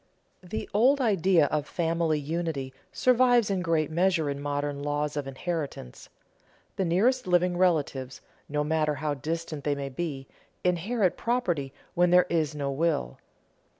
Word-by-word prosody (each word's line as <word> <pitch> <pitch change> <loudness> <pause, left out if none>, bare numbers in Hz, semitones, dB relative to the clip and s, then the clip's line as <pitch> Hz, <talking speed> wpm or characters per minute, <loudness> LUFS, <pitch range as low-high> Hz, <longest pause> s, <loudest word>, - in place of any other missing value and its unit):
The 185 +4 -5
old 255 +7 +4
idea 190 - +3
of 150 -1 -1
family 165 -2 0
unity 150 -3 -3 0.2
survives 245 -3 +3
in 190 -2 0
great 160 -3 0
measure 170 -3 +2
in 140 0 -5
modern 145 0 -2
laws 145 0 -2
of 145 -2 -3
inheritance. 140 - -5 0.7
The 190 - 0
nearest 220 +8 +2
living 180 0 +2
relatives, 145 -7 0 0.3
no 150 0 0
matter 155 0 +1
how 150 +1 -2
distant 155 +1 -4
they 145 -1 0
may 140 -1 -4
be, 135 -1 -4 0.4
inherit 180 +3 +1
property 175 - -1 0.2
when 180 -1 +3
there 180 +1 +6
is 155 -3 0
no 140 -1 -2
will. 145 - -1
160 Hz, 145 wpm, -27 LUFS, 145-180 Hz, 0.7 s, there